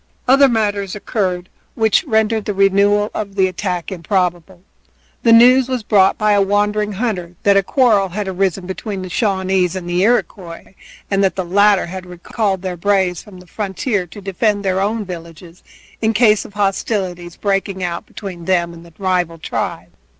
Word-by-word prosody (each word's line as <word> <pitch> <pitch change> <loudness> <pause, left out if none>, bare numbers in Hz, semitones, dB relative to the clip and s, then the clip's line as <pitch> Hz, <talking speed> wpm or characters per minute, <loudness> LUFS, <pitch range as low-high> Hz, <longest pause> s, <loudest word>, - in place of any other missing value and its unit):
Other 275 +2 +6
matters 205 -4 -1
occurred 185 -4 -2 0.3
which 220 - +2
rendered 220 -3 +1
the 205 - -3
renewal 200 +2 +3
of 200 -2 -5
the 190 -2 +3
attack 180 -2 -3
improbable. 180 0 -2 0.6
The 230 - +3
news 250 +3 +6
was 255 -3 -2
brought 195 -2 +3
by 215 0 +2
a 205 -1 +4
wandering 210 +1 0
hunter 190 -5 -3
that 200 0 +4
a 195 - +5
quarrel 210 -3 +2
had 200 +2 -4
arisen 190 -1 -1
between 190 +1 -5
the 185 - -7
Shawnees 190 -3 0
and 180 -2 -5
the 175 +1 0
Iroquois, 190 -6 -1 0.4
and 195 0 +2
that 190 - +1
the 185 - -3
latter 200 +2 +3
had 185 +1 -8
recalled 190 +2 -3
their 185 -2 -4
braves 190 -1 +1
from 195 -4 -14
the 180 - -15
frontier 200 +1 -3
to 205 +4 -11
defend 200 +1 -1
their 190 0 +1
own 210 +2 -1
villages 170 -1 -10 0.4
in 220 0 +1
case 215 -2 +3
of 205 - -13
hostilities 190 -3 -2
breaking 195 -1 -2
out 170 -1 -4
between 180 -5 -8
them 175 -2 +1
and 165 0 -12
the 170 -1 -17
rival 180 -4 -1
tribe. 160 - -4
195 Hz, 170 wpm, -18 LUFS, 180-210 Hz, 0.6 s, Other